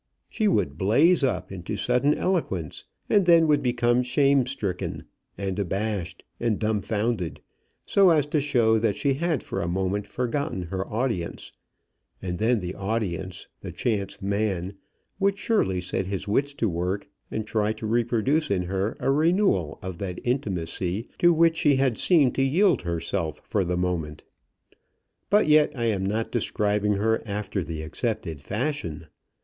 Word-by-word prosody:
She 215 - 0
would 90 - +1
blaze 140 - +4
up 95 -9 -1
into 95 +2 -5
sudden 125 +6 +2
eloquence, 125 - -2 0.2
and 200 -4 +3
then 165 -1 +7
would 150 -2 +3
become 120 0 +2
shame 135 +1 +3
stricken, 100 -9 -3 0.3
and 100 0 -3
abashed, 95 -3 -2 0.2
and 115 -3 0
dumfounded, 105 -3 -1 0.5
so 195 -2 +5
as 155 -4 +4
to 150 - +3
show 115 -6 +3
that 110 -2 +1
she 140 -2 +1
had 160 -1 -1
for - - -3
a 85 - -2
moment 95 +3 -1
forgotten 125 -6 -2
her 95 +3 -4
audience, 110 -7 -2 0.7
and 90 -1 -4
then 115 0 +2
the 90 0 -4
audience, 95 -4 -3
the - - -7
chance 100 -5 -2
man, 100 -2 -1 0.5
would 200 0 +2
surely 200 - +1
set 90 +1 -2
his 100 +1 -4
wits 140 +7 0
to 115 - 0
work 90 +2 -2 0.2
and 110 - -3
try 105 -1 0
to 110 - -8
reproduce 120 +6 +1
in 95 -3 +1
her 95 +4 -2
a - - +1
renewal 155 - +2
of 95 -2 -6
that 90 -3 -4
intimacy 95 -4 -2
to 175 - +6
which 165 0 +3
she 145 -3 +4
had 130 -3 +1
seemed 150 -8 +4
to 135 - +1
yield 170 - +3
herself 85 -2 -3
for 100 - 0
the 90 0 -1
moment. 85 -5 -2 1.1
But 210 +2 +4
yet 150 0 +5
I 120 -2 -2
am 105 -4 0
not 110 +4 -1
describing 105 -2 0
her 110 +3 +1
after 100 -2 -3
the 80 0 -5
accepted 80 - -3
fashion. 105 - -3
110 Hz, 155 wpm, -25 LUFS, 95-135 Hz, 1.1 s, then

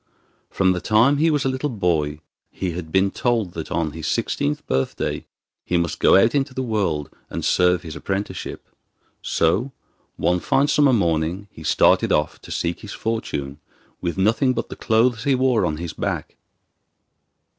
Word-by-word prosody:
From 95 -1 +2
the 90 -1 -1
time 115 +7 +4
he 160 +3 +3
was 145 -3 +1
a - - +3
little 130 +3 -1
boy 80 - -1 0.3
he 95 -2 -3
had 80 -2 -6
been 95 +2 +3
told 115 -7 0
that 80 - -6
on 80 -3 0
his 80 +1 -6
sixteenth 75 +1 -1
birthday 65 0 -2 0.4
he 90 - 0
must 85 -2 -1
go - - +5
out 115 +4 +4
into 135 -2 0
the 130 - -1
world 95 - -1 0.2
and - - -4
serve 90 -1 +3
his 80 -2 -7
apprenticeship. 100 +1 -4 0.5
So, 100 +11 +1 0.5
one 90 0 +1
fine 135 +9 +2
summer 145 -1 +4
morning, 85 -2 0
he - - -13
started 80 - +3
off - - 0
to - - -13
seek 85 0 -2
his 105 - -8
fortune 75 -11 -3 0.4
with 85 +2 -2
nothing 115 +7 +2
but 115 - -3
the - - -7
clothes 115 +1 +2
he 140 -2 +3
wore 125 -7 +2
on 75 -1 -2
his 85 -1 -5
back. - - -3
95 Hz, 170 wpm, -22 LUFS, 85-120 Hz, 0.5 s, go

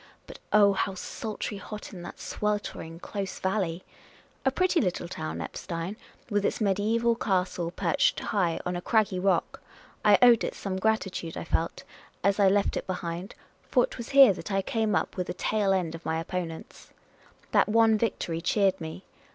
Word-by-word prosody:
But, - - -11
oh, 205 -1 +6
how 195 0 -1
sultry 210 +2 -5
hot 210 +1 -8
in 180 - -8
that - - -9
sweltering, 205 -6 -3
close 195 0 -5
valley! 185 -3 -1 0.6
A 265 - +4
pretty 365 +5 +2
little 180 -3 -1
town, 80 - -5
Eppstein, 170 - -5 0.3
with 205 -3 0
its - - 0
mediaeval 220 +3 +2
castle 185 -5 -1
perched 175 -1 +1
high 180 -6 0
on 180 0 -1
a 175 - -3
craggy 205 -2 +1
rock. 185 -2 0 0.4
I 210 -2 +7
owed 240 -2 +7
it - - -3
some 190 -2 -4
gratitude, 190 -6 -1
I - - -4
felt, 165 0 -1 0.4
as 200 +2 +2
I 200 - +6
left 200 +1 +2
it - - -5
behind, 175 +1 -4 0.3
for - - +4
't - - -11
was 235 - -6
here 275 -6 +8
that 195 - -7
I 195 0 +1
came 220 -1 0
up - - -1
with 180 -1 -2
the 175 - -4
tail 210 -1 +1
end 180 -4 0
of 165 0 -8
my 160 0 -1
opponents. 165 -1 -6 0.6
That - - +4
one 225 0 +5
victory 185 -6 -1
cheered 195 +1 +2
me. 160 +4 -7
195 Hz, 175 wpm, -28 LUFS, 175-215 Hz, 0.6 s, here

